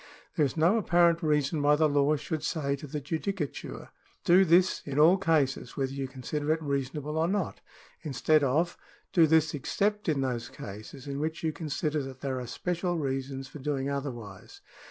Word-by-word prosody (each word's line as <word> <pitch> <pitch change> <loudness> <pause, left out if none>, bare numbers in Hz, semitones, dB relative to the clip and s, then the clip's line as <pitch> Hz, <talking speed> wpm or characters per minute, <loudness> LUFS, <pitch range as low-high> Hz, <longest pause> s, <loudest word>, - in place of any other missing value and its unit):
There 150 - +3
is 135 - -8
no 170 +8 +4
apparent 170 -4 +3
reason 150 -1 +1
why 145 +1 +5
the 155 +1 +3
law 145 +1 +3
should 155 +1 -3
say 145 -3 -1
to 150 - -9
the 150 +2 -4
judicature: 160 +2 -4 0.2
" - - -35
Do 185 +2 +6
this 180 +2 +4
in 140 -1 -5
all 160 +5 +7
cases, 145 -9 0
whether 135 -1 -1
you 135 -1 -3
consider 145 +4 -3
it 160 0 +1
reasonable 145 +2 -2
or 165 - +2
not," 195 -1 -2 0.4
in 155 -4 -5
stead 155 +4 +3
of: 160 +6 +1 0.2
" - - -35
Do 165 -3 +6
this 160 0 +3
except 205 +7 -1
in 145 -3 +1
those 125 -3 -2
cases 105 +6 -9
in 140 -1 -4
which 160 +2 -3
you 160 -1 0
con 155 +1 -6
sider 150 +1 -1
that 135 -1 -8
there 130 -2 -2
are 125 - -6
special 175 +6 -2
reasons 135 -2 -3
for 140 +2 -10
doing 140 0 -2
otherwise." 135 - -6
150 Hz, 195 wpm, -29 LUFS, 135-165 Hz, 0.4 s, all